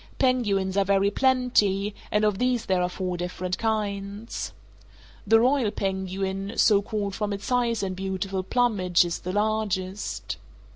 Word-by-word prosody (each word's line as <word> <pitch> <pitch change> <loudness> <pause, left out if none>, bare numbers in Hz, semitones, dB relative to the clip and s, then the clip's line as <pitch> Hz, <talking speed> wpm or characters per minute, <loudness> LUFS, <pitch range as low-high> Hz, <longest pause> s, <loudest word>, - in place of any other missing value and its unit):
Penguins 205 -7 +1
are 200 - +5
very 200 +1 +2
plenty, 210 -6 +2 0.2
and 210 0 +2
of 210 -2 +1
these 250 -2 +1
there 185 -1 +1
are 180 - +1
four 180 -1 -3
different 180 +1 -3
kinds. 210 -1 -2 0.8
The 225 +2 +6
royal 255 -1 +3
penguin, 195 0 -3
so 205 -2 +5
called 205 -1 -3
from 210 +1 -2
its 200 0 -4
size 240 -3 +1
and 190 -1 -2
beautiful 190 0 -2
plumage, 190 -5 +2
is 170 - -3
the 180 - -4
largest. 205 -2 -2
200 Hz, 145 wpm, -26 LUFS, 190-220 Hz, 0.8 s, The